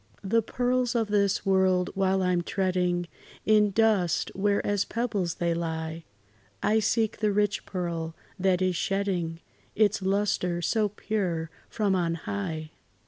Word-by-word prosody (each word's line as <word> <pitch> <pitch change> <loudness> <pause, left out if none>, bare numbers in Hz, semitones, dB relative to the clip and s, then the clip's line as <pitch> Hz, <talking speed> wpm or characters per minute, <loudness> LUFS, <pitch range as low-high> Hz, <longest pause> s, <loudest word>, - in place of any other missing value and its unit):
The 225 +4 +2
pearls 245 +2 0
of 225 -3 +1
this 200 -2 +1
world 190 -2 +3
while 190 -1 +1
I 180 - +2
'm 175 -1 +2
treading 180 -1 0 0.4
In 210 -1 +5
dust, 200 -4 +2
where 200 +1 +1
as 205 -1 +1
pebbles 210 -7 -2
they 170 -1 0
lie, 160 -1 -4 0.6
I 215 +2 +3
seek 220 +1 +1
the 215 -1 +2
rich 205 0 0
pearl, 170 -3 -3 0.2
that 185 -1 +2
is 185 -1 +1
shedding 180 -3 -1 0.3
Its 210 -1 +3
lustre 190 -2 0
so 210 +5 +1
pure 180 -6 -2 0.2
from 205 -3 0
on 170 -3 +1
high. 160 -3 -4
190 Hz, 140 wpm, -27 LUFS, 175-210 Hz, 0.6 s, In